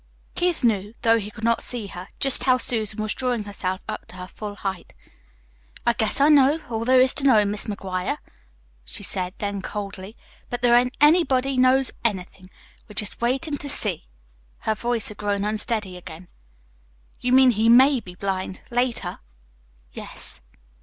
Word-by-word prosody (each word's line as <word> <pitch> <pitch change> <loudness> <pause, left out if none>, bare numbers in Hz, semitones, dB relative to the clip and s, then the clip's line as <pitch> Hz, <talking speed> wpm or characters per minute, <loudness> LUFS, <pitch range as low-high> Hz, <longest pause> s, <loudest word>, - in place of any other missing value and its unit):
Keith 350 -5 0
knew 210 -2 +1
though 230 0 +4
he 205 -1 -6
could 215 +1 -12
not 230 0 +2
see 240 -4 -2
her 185 -1 -8
just 270 -2 +5
how 255 -1 +4
Susan 220 -4 0
was 215 - -1
drawing 245 -4 -2
herself 190 -2 -4
up - - -6
to - - -9
her 180 0 -7
full 205 +2 -8
height. 195 -3 -5 0.9
"I 235 - +4
guess 220 +1 -1
I 280 - +5
know 295 0 +5
all 225 0 -2
there 255 +1 +5
is 255 0 +5
to 285 - -4
know, 225 -7 +5
Mis' 205 0 -1
McGuire," 190 -3 -3 0.7
she - - -5
said 185 -1 -3
then 200 -1 -3
coldly. 200 +1 -7 0.3
"But 245 0 -4
there 240 -1 +5
ain't 250 +1 +3
anybody 275 -4 +4
KNOWS 255 +1 +3
anything. 185 -4 -3 0.4
We're 210 - -13
jest 210 +3 -3
waitin' 270 +5 -1
to 285 - -7
see." 205 - 0 0.5
Her 220 - 0
voice 235 +1 -2
had 210 - -10
grown 205 -1 -1
unsteady 210 -2 -2
again. 175 0 -11 0.9
"You 250 - -1
mean 260 0 +7
he 225 0 +2
MAY 260 +3 +6
be 180 -5 -12
blind, 190 -1 -4
later?" 245 0 -1 0.7
"Yes." - - -4
220 Hz, 170 wpm, -23 LUFS, 200-255 Hz, 0.9 s, mean